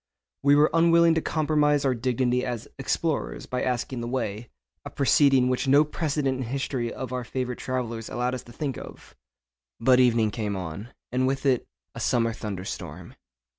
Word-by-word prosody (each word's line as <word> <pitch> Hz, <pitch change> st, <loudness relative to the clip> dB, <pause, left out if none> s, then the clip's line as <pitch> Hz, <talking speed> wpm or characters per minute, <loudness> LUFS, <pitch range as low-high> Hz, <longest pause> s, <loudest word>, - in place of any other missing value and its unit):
We 145 Hz, +1 st, +5 dB
were 150 Hz, +1 st, +4 dB
unwilling 170 Hz, 0 st, +5 dB
to 160 Hz, -, +1 dB
compromise 150 Hz, -2 st, +1 dB
our 130 Hz, -, +3 dB
dignity 125 Hz, +1 st, 0 dB
as 120 Hz, -3 st, -4 dB
'explorers' -, -, -2 dB
by 125 Hz, -, -3 dB
asking 125 Hz, 0 st, -2 dB
the 120 Hz, -, -4 dB
way—a 110 Hz, -, -6 dB
proceeding 135 Hz, -2 st, +4 dB
which 125 Hz, +2 st, 0 dB
no 140 Hz, +3 st, +6 dB
precedent 145 Hz, -3 st, -1 dB
in -, -, -2 dB
the -, -, -8 dB
history 130 Hz, -3 st, -2 dB
of 130 Hz, -1 st, -6 dB
our 125 Hz, -1 st, -2 dB
favourite 125 Hz, 0 st, -4 dB
travellers 120 Hz, -3 st, -3 dB
allowed 125 Hz, +1 st, -1 dB
us 130 Hz, -, -4 dB
to 120 Hz, -, -13 dB
think 135 Hz, +1 st, -4 dB
of. -, -, -12 dB, 0.6 s
But 125 Hz, +2 st, +5 dB
evening 115 Hz, -4 st, +3 dB
came 105 Hz, -2 st, -3 dB
on, 95 Hz, +4 st, -6 dB, 0.2 s
and 130 Hz, +1 st, +1 dB
with 135 Hz, +1 st, -2 dB
it 130 Hz, -3 st, +2 dB, 0.3 s
a -, -, -8 dB
summer 115 Hz, -2 st, +1 dB
thunder 100 Hz, -4 st, -5 dB
storm. -, -, -7 dB
125 Hz, 175 wpm, -26 LUFS, 115-140 Hz, 0.6 s, no